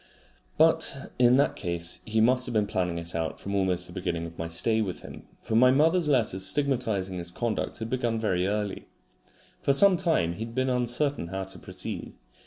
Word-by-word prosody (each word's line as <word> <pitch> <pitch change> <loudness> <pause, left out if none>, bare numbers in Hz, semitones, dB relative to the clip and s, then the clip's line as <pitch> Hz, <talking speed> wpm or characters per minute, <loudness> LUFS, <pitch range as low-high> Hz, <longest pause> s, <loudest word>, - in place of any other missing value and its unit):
But 160 -3 +2
in 125 +1 +6
that 140 - +2
case 85 -2 -3
he 110 0 0
must 125 +2 +3
have - - -4
been 105 -2 +2
planning 90 -3 -2
it 85 0 -5
out 80 -1 -3
almost 95 -3 0
from 85 - -11
the 90 - -5
beginning 85 -2 -2
of 85 0 -9
my 80 - -4
stay 110 +7 +1
with 95 -5 -4
him, - - -11
for 110 - -3
my 125 +3 +6
mother's 160 +5 +3
letters 110 -9 +1
stigmatising 110 -9 0
his 85 0 -3
conduct 110 +4 -3
had 110 0 -6
begun 120 -3 0
very 95 -4 0
early. 105 -1 -3 0.7
For 140 - +2
some 190 +5 +6
time 160 - +1
he 85 - -11
had 115 0 -11
been 130 0 +1
uncertain 125 - 0
how 95 +2 -4
to 95 0 -9
proceed. - - -5
110 Hz, 195 wpm, -27 LUFS, 90-130 Hz, 0.7 s, in